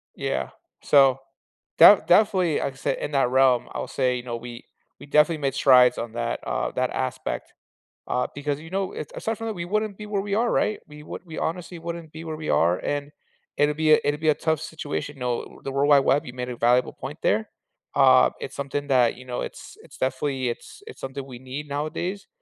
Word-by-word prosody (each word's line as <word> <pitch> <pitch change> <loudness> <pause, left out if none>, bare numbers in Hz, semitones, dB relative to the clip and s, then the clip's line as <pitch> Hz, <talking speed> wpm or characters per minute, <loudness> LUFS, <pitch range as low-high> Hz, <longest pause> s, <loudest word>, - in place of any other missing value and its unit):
Yeah. - - -2 0.3
So, 135 -2 +5 0.6
de 190 +4 +9
definitely, 185 -4 +4
like 135 - -2
I - - -20
said, 130 - -2
in 145 - -4
that 135 -4 +2
realm, 130 -2 +3
I'll - - -4
say, 125 -2 0
you 120 - -6
know, 120 -2 -4
we 120 0 -9 0.3
we - - -11
definitely 150 +2 +3
made 135 -1 -1
strides 125 -2 +6
on 115 -1 -5
that, 120 0 -2
uh - - -1
that - - 0
aspect, - - -4 0.5
uh, 125 - 0
because, 145 0 -2
you 165 +1 -11
know, 190 0 -2
it's 150 - -7
aside 225 -1 -3
from 225 - -5
that, 220 - -2
we 170 -2 -5
wouldn't 215 +1 -1
be 210 - -8
where 205 -2 -1
we 200 0 -4
are, 235 +2 +1
right? 215 - +1
We 150 0 -12
would - - -8
We 160 -2 -9
honestly 170 +1 -4
wouldn't 170 -1 -7
be 160 +1 -9
where 160 -1 -5
we 155 0 -6
are, 85 +2 +3
and 145 0 -3 0.5
it'll 145 0 +2
be 155 0 +4
a - - +6
it'll 145 +1 0
be 155 -1 +1
a 150 - +4
tough 160 -2 -1
situation. 145 -3 -5
No, 125 -1 -4
the 135 - -4
World 140 +2 +1
Wide 145 -1 +7
Web, 145 +3 +2
you 125 - -8
made 125 0 -5
a 120 - -6
valuable 125 +2 +2
point 145 +3 -8
there, 110 +2 +1 0.5
um, 60 -1 +6
it's - - -7
something 140 +1 -3
that, 125 -4 +3
you 130 - -12
know, 125 -1 -4
it's - - -8
it's - - -16
definitely 130 -1 -1
it's 120 - -8
it's - - -11
something 135 0 -6
we 125 -3 -10
need 130 +3 -7
nowadays, 155 +7 -4
145 Hz, 220 wpm, -24 LUFS, 130-165 Hz, 0.6 s, de